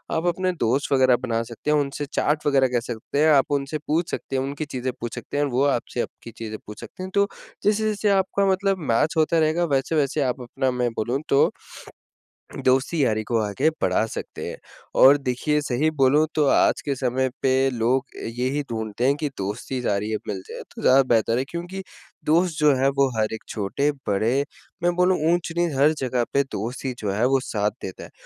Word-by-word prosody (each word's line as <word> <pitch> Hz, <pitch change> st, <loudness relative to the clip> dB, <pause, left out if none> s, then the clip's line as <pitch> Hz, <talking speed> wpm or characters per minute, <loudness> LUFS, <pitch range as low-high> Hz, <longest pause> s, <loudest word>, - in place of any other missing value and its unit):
आप 165 Hz, +1 st, -1 dB
अपने 185 Hz, +2 st, +1 dB
दोस्त 125 Hz, +5 st, +1 dB
वगैरह 130 Hz, -1 st, +5 dB
आप 120 Hz, -, +2 dB
बना 115 Hz, -2 st, 0 dB
सकते 115 Hz, +6 st, -4 dB
हैं, 150 Hz, -, +4 dB
उनसे 145 Hz, 0 st, -2 dB
चैट 150 Hz, +2 st, -1 dB
वगैरह 135 Hz, -2 st, +4 dB
कर 120 Hz, -, +2 dB
सकते 120 Hz, +4 st, -4 dB
हैं, 155 Hz, -, +5 dB
आप 135 Hz, 0 st, +3 dB
उनसे 140 Hz, +1 st, -1 dB
पूछ 165 Hz, +3 st, 0 dB
सकते 135 Hz, -, -4 dB
हैं, 130 Hz, -, +1 dB
उनकी 140 Hz, +3 st, -4 dB
चीज़ें 130 Hz, -3 st, -3 dB
पूछ 120 Hz, -1 st, -4 dB
सकते -, -, -6 dB
हैं 145 Hz, -, +2 dB
और 145 Hz, -, 0 dB
वो 125 Hz, +3 st, +2 dB
आपसे 120 Hz, 0 st, -3 dB
आपकी 115 Hz, -, -8 dB
चीज़ें 110 Hz, -1 st, -5 dB
पूछ 105 Hz, -, -10 dB
सकते 185 Hz, -, -9 dB
हैं। 185 Hz, -, -5 dB
तो, 200 Hz, 0 st, +4 dB, 0.4 s
जैसे-जैसे 210 Hz, 0 st, +1 dB
आपका 195 Hz, 0 st, +2 dB
मतलब 195 Hz, +1 st, +1 dB
मैच 150 Hz, +7 st, +2 dB
होता 160 Hz, +1 st, +3 dB
रहेगा, 160 Hz, +2 st, +2 dB
वैसे-वैसे 145 Hz, +1 st, 0 dB
आप 130 Hz, -1 st, -1 dB
अपना, 130 Hz, +2 st, -1 dB
मैं 125 Hz, -1 st, 0 dB
बोलूँ 120 Hz, +5 st, -1 dB
तो, 140 Hz, -, +4 dB, 1.1 s
दोस्ती-यारी 130 Hz, -4 st, +2 dB
को 115 Hz, +1 st, -1 dB
आगे 135 Hz, +10 st, +1 dB
बढ़ा -, -, +2 dB
सकते -, -, -6 dB
हैं। -, -, -7 dB, 0.4 s
और 140 Hz, +2 st, +8 dB
देखिए, 140 Hz, +3 st, 0 dB
सही 145 Hz, +2 st, +1 dB
बोलूँ 145 Hz, +4 st, +5 dB
तो 150 Hz, -2 st, +3 dB
आज -, -, +2 dB
के 140 Hz, -1 st, 0 dB
समय 130 Hz, 0 st, 0 dB
पे 135 Hz, 0 st, +3 dB
लोग 125 Hz, +2 st, +1 dB, 0.2 s
यही 125 Hz, +5 st, -1 dB
ढूँढ़ते 110 Hz, +1 st, -3 dB
हैं 140 Hz, +2 st, +4 dB
कि 150 Hz, -, -1 dB
दोस्ती 105 Hz, +6 st, -4 dB
जारी 105 Hz, -1 st, -1 dB
अब 110 Hz, -, -1 dB
मिल 100 Hz, -3 st, -3 dB
जाएँ, -, -, -7 dB
तो -, -, -8 dB
ज़्यादा 135 Hz, +1 st, +6 dB
बेहतर 115 Hz, +1 st, +2 dB
है, 130 Hz, -, +1 dB
क्योंकि 175 Hz, +3 st, -6 dB, 0.4 s
दोस्त 165 Hz, +1 st, +2 dB
जो 150 Hz, -1 st, +5 dB
हैं, 130 Hz, +1 st, +2 dB
वो 140 Hz, 0 st, +2 dB
हर 110 Hz, 0 st, 0 dB
एक 110 Hz, -, -6 dB
छोटे-बड़े 125 Hz, +2 st, 0 dB, 0.4 s
मैं 175 Hz, 0 st, +3 dB
बोलूँ 180 Hz, +1 st, +3 dB
ऊँच-नीच 170 Hz, -2 st, 0 dB
हर 150 Hz, +3 st, +5 dB
जगह 125 Hz, -2 st, 0 dB
पे 140 Hz, 0 st, +3 dB
दोस्त 120 Hz, +6 st, -4 dB
ही 130 Hz, -, -1 dB
जो 100 Hz, -2 st, -2 dB
हैं, 105 Hz, +4 st, -1 dB
वो 135 Hz, +1 st, +3 dB
साथ 105 Hz, -3 st, -1 dB
देता 95 Hz, -, -7 dB
हैं। -, -, -12 dB
135 Hz, 205 wpm, -24 LUFS, 120-155 Hz, 1.1 s, और